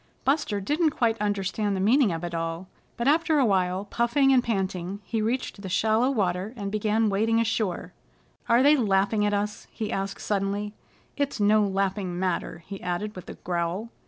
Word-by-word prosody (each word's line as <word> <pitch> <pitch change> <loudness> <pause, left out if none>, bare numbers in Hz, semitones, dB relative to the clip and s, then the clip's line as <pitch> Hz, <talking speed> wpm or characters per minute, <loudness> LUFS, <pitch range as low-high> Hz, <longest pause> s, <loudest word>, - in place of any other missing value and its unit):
Buster 275 -7 +1
didn't 300 - +1
quite 230 -3 +1
understand 205 0 -1
the - - -2
meaning 225 +3 +4
of 165 0 -4
it 175 0 -4
all, 165 +2 -3 0.3
but 235 - -1
after 315 +1 +3
a 275 - +4
while, 190 -1 +1
puffing 255 +6 +2
and 250 -2 +4
panting, 190 -3 -2
he 225 +2 -2
reached 225 -2 -2
shallow 220 +6 +2
water, 200 -2 -1
and 200 -2 -4
began 215 +1 +1
wading 220 +3 +2
ashore. 220 -5 -1 0.6
"Are 235 +2 +5
they 290 +2 +6
laughing 210 -3 +2
at 205 - 0
us?" 210 +1 -3
he 215 -2 -5
asked 195 0 -3
suddenly. 205 +1 -2 0.4
"It's 285 -4 -1
no 210 +1 +4
laughing 195 -2 -1
matter," 180 -2 -2
he 195 -1 -8
added 180 +4 -3
with 185 - -9
a - - -7
growl. 175 +5 -3
205 Hz, 175 wpm, -26 LUFS, 190-230 Hz, 0.6 s, they